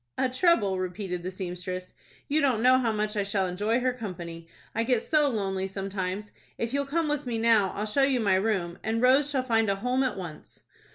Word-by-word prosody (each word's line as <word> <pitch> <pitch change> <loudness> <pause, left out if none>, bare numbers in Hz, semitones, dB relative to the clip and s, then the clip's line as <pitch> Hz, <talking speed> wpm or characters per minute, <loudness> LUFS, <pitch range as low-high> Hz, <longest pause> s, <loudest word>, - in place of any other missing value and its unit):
"A 260 - +2
trouble," 255 - +2
repeated 180 -1 -3
the 180 - -4
seamstress. 185 0 -5 0.3
"You 305 +2 +2
don't 250 -5 +2
know 255 +1 +6
how 235 -3 +1
much 215 0 -1
I 205 - +1
shall 195 -1 0
enjoy 205 +6 0
her 255 0 +1
company. 170 -8 -7 0.3
I 225 - 0
get 235 -1 +1
so 300 -2 +3
lonely 195 -5 -2
sometimes. 195 +1 -4 0.3
If 230 +2 -3
you'll 280 0 0
come 325 +3 0
with 295 -2 -2
me 235 -2 -1
now, 225 -4 +4
I'll 210 - -2
show 215 +6 +1
you 270 -2 +3
my 200 -4 +2
room, 185 -3 0
and 220 +1 0
Rose 265 +4 +4
shall 270 -3 0
find 225 -4 +2
a 195 - +2
home 250 +6 0
at 260 -5 0
once." 175 -5 -9
215 Hz, 215 wpm, -27 LUFS, 190-255 Hz, 0.3 s, know